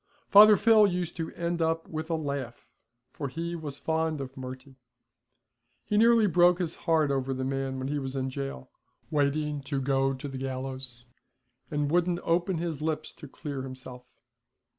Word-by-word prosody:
Father 210 0 +9
Phil 220 -1 +6
used 180 -3 -2
to 165 -1 -3
end 170 0 -2
it - - +4
up 165 0 -1
with 160 +1 -5
a 165 - +1
laugh, 140 -6 -4 0.5
for 145 - -4
he 170 +5 -4
was 150 -4 -6
fond 160 -1 -1
of 135 -1 -6
Murty. 130 +1 -9 1.1
He 210 - -1
nearly 230 +1 +5
broke 175 -2 +5
his 175 -3 -2
heart 160 -4 +1
over 135 -1 -1
the 130 - -3
man 135 0 -2
when 130 0 -3
he 145 +1 -1
was 135 -1 -5
in 130 0 -2
jail, 135 - -6 0.4
waiting 150 0 0
to 140 0 -3
go 135 0 +1
to 130 +2 -7
the 135 -1 -6
gallows, 130 -2 -5 0.6
and 145 -1 -1
wouldn't 175 0 +2
open 175 +2 +1
his 165 -3 -3
lips 155 0 -2
to 150 - -11
clear 140 -1 -6
himself. 130 -1 -9
145 Hz, 175 wpm, -28 LUFS, 135-170 Hz, 1.1 s, Father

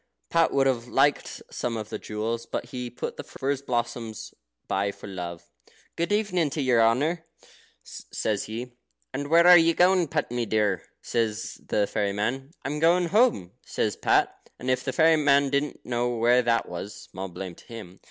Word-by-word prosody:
Pat 165 -1 +3
would 135 -1 +2
have 125 -3 0
liked 140 +3 +1
some 120 -2 -3
of 105 -1 -6
the 110 - -5
jewels, 115 +2 -4
but - - -3
he 125 0 -5
put 120 - -6
the - - -5
furze 135 0 -3
blossoms 120 -4 -3 0.3
by 100 +1 0
for - - -13
love. 90 -4 -6 0.5
"Good 170 +4 -1
evening 195 -7 +1
to 150 - -3
your 125 -3 +4
honour," 145 +10 +2 0.6
says 105 -2 -3
he. 120 +3 -6 0.4
"And 145 +1 -3
where 170 +2 +6
are 180 0 +10
you 165 0 +3
going, 180 -1 +4
Pat, 150 -3 -2
dear?" 110 -6 0 0.2
says 110 -2 -2
the 105 - +2
fairy 100 -1 -1
man. 125 +7 -2 0.2
"I'm 150 +1 -2
going 170 +2 +3
home," 210 - +3
says - - -1
Pat. - - +1
And 130 +1 -2
if 130 0 0
the 130 - -2
fairy 160 +2 +4
man 140 -2 +3
didn't 140 +1 -2
know 120 0 0
where 120 +2 +4
that 115 -1 +1
was, 95 +4 -6
small 95 +1 -7
blame 90 +1 -7
to - - -18
him. 105 -6 -10
125 Hz, 180 wpm, -26 LUFS, 110-150 Hz, 0.6 s, are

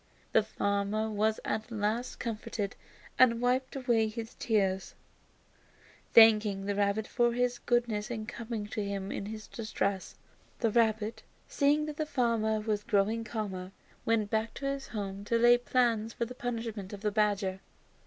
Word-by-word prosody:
The 220 - +5
farmer 205 +1 -1
was 215 +1 +1
at 220 +2 -2
last 225 +2 -2
comforted, 215 -3 -3 0.4
and, 235 -2 +6
wiping 255 +2 0
away 225 -3 +3
his 225 +1 -6
tears, 195 -4 0 1.2
thanked 225 -2 +8 0.2
the 205 - 0
rabbit 200 +1 +1
for 240 -1 +2
his 245 0 0
goodness 235 -4 0
in 220 -3 -4
coming 225 -1 -5
to 210 - -2
him 200 -1 -3
in 200 - -4
his 215 0 -7
distress. 200 -4 -3 0.4
The 225 -3 +1
rabbit, 220 -1 +1 0.3
seeing 295 +1 +2
that 305 -1 -6
the 310 - -2
farmer 230 -5 +1
was 210 -1 -1
growing 220 +1 +1
calmer, 195 -4 -5 0.3
went 220 -2 +1
back 220 0 -1
to 275 - -6
his 275 0 -2
home 200 -2 -5
to 230 +2 +2
lay 240 +1 +6
his 240 0 +5
plans 230 -3 +2
for 235 - -2
the 245 - -8
punishment 230 -5 -4
of 200 - -7
the 210 -1 0
badger. 200 -3 +1
220 Hz, 160 wpm, -30 LUFS, 205-235 Hz, 1.2 s, thanked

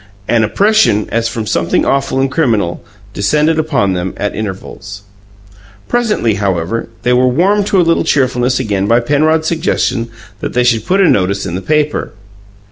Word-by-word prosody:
An 115 -2 +2
oppression, 195 - +2
as 115 0 0
from 115 -2 -4
something 85 -4 0
awful 135 -1 0
and 135 0 0
criminal, 110 - 0 0.3
descended 150 +12 +1
upon 135 -11 0
them 90 0 -3
at 105 - -2
intervals. 100 0 -7 0.8
Presently, 215 - 0
however, 95 +4 -2
they 125 0 +2
were 125 +1 +3
warmed 195 +10 +2
to 195 - +2
a - - +5
little 165 0 +2
cheerfulness 130 -2 +1
again 100 -5 -1
by 115 +2 +4
Penrod's 155 +5 +1
suggestion 155 -8 -1 0.3
that - - -5
they 125 - +2
should 115 -3 +1
put 195 +2 +2
a 190 - +5
notice 100 - +1
in 90 - -4
the 95 - -3
paper. 150 +4 -1
120 Hz, 165 wpm, -14 LUFS, 105-155 Hz, 0.8 s, a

